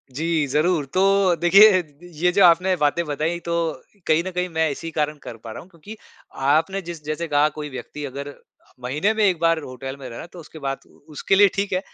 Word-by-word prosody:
जी, 155 +3 -1
ज़रूर, 155 +2 +1
तो 190 +4 +2
देखिए 185 +3 +6
द 145 -3 -26 0.2
ये 175 +4 +1
जो 195 +2 +3
आपने 180 +2 +4
बातें 150 +1 +1
बताई 155 +3 -2
तो 170 - -2 0.5
कहीं 155 +2 +3
न - - -4
कहीं 180 0 -2
मैं 160 -1 0
इसी 165 +4 -6
कारण 150 -1 -2
कर 115 - -9
पा 115 - -8
रहा - - -8
हूँ 180 - -17
क्योंकि 190 +5 -12 0.5
आपने 165 +7 +1
जिस 170 -3 -9
जैसे 155 +3 -3
कहा 150 0 +3
कोई 150 -1 -5
व्यक्ति 145 +2 -7
अगर 140 +1 -7 0.5
महीने 150 - 0
में 220 -1 0
1 185 -4 +1
बार 165 0 +2
होटल 130 +1 -7
में 135 - -8
रहे 115 - -9
ना - - -7
तो 180 - -10
उसके 160 -1 -12
बाद 135 -1 -3
उ - - -24
उसके 150 +6 0
लिए 200 +1 +7
ठीक 200 0 -2
है, 185 - +1
165 Hz, 225 wpm, -22 LUFS, 145-180 Hz, 0.5 s, लिए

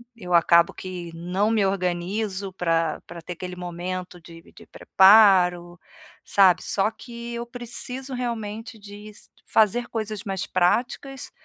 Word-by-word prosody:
eu 180 -6 -6
acabo 170 0 +5
que 180 -2 -7
não 180 +6 -1
me 215 -3 +2
organizo 190 +2 -2
pra 165 -3 -1
pra 170 0 -9
ter 175 - -7
aquele 180 +1 -7
momento 180 +1 -6
de 165 0 -13
de - - -15
preparo, 185 -4 +4 0.4
sabe. 190 -3 +4
Só 200 +1 +1
que 235 +1 -9
eu 235 0 -4
preciso 245 +2 -6
realmente 225 -1 -5
diz 205 +1 -13 0.2
fazer 225 +3 +2
coisas 215 -2 -4
mais 195 -2 -3
práticas, 245 +8 -1
195 Hz, 130 wpm, -24 LUFS, 175-225 Hz, 0.4 s, acabo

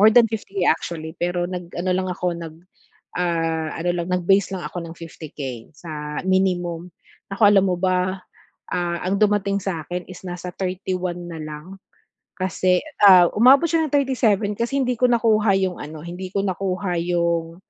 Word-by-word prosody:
more 215 +2 +8
than 235 -2 +7
50K 195 -4 -2
actually 160 -1 -3
pero 175 0 0
nag-ano 180 0 -4
lang 185 0 -1
ako, 180 0 -3
nag, 165 -2 -8 0.6
ah, 165 -2 0
ano 175 +1 0
lang 170 0 -2
nag-base 190 +2 +2
lang 180 - -6
ako 175 -2 -6
ng 165 - -9
50K 145 -7 -7
sa 150 -2 -6
minimum. 180 -2 0 0.4
Nako 200 - -3
alam 195 -2 +5
mo 180 - +1
ba, 185 0 0 0.5
ah, 175 -1 -1
ang 190 +2 0
dumating 200 -1 +2
sa 170 -5 -3
akin 180 0 -5
is 185 - -10
nasa 180 0 -5
31 185 -2 -3
na 165 - -6
lang 155 +5 -8 0.6
kasi, 185 -1 +1 0.2
ah, 180 -3 +9
umabot 260 +7 +7
siya 320 -1 +2
ng - - -17
37 235 -7 +2
kasi 240 +4 -1
hindi 250 0 0
ko 250 - +6
nakuha 220 -4 +3
'yong 190 -2 -1
ano, 155 +1 -8
hindi 180 +2 -6
ko 200 - +1
nakuha 185 -1 -2
'yong, 170 -1 0
180 Hz, 165 wpm, -22 LUFS, 170-195 Hz, 0.6 s, ah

